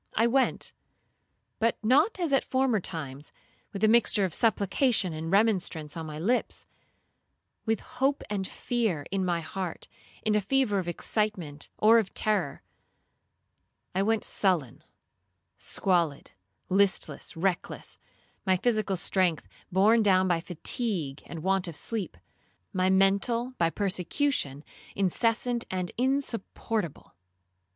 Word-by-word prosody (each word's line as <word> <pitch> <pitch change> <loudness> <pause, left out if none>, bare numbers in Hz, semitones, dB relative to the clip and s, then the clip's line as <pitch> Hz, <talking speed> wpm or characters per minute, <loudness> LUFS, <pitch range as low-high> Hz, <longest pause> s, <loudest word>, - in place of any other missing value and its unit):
I 225 - +3
went, 260 +3 +1 0.9
but 230 +1 +2
not 295 - +3
as 335 -5 0
at 270 - +4
former 260 -4 +1
times, 145 -6 -6 0.4
with 200 +1 -5
a - - +7
mixture 220 -3 +4
of 180 - -4
supplication 220 - +2
and 160 +1 -5
remonstrance 185 -7 +1
on 165 -1 -5
my 150 -1 -6
lips,—with 225 +1 -4
hope 275 +2 -1
and 195 -2 -2
fear 220 -12 -1
in 195 -1 0
my 175 -2 0
heart,—in 185 +5 -5
a 210 - +3
fever 215 -1 +1
of 180 - -4
excitement 175 -5 -2
or 225 +2 +6
of 200 -4 -4
terror,—I 190 0 -5
went 220 +1 +1
sullen, 175 - 0 0.7
squalid, 170 -7 -1 0.4
listless, 185 -7 +1
reckless; 180 +1 -2 0.4
my 190 -2 +3
physical 215 -2 +1
strength, 175 - +1 0.2
borne 210 +5 +5
down 190 -3 +4
by 170 -2 +1
fatigue 170 - -2
and 165 -2 -7
want 190 0 +1
of 165 -3 -6
sleep; 220 -5 -1 0.6
my 185 -1 +2
mental, 200 +6 +2
by 165 -1 +3
persecution, 185 - -1 0.3
incessant 230 +5 +1
and 185 -1 -3
insupportable. 230 - -2
195 Hz, 115 wpm, -28 LUFS, 175-225 Hz, 0.9 s, a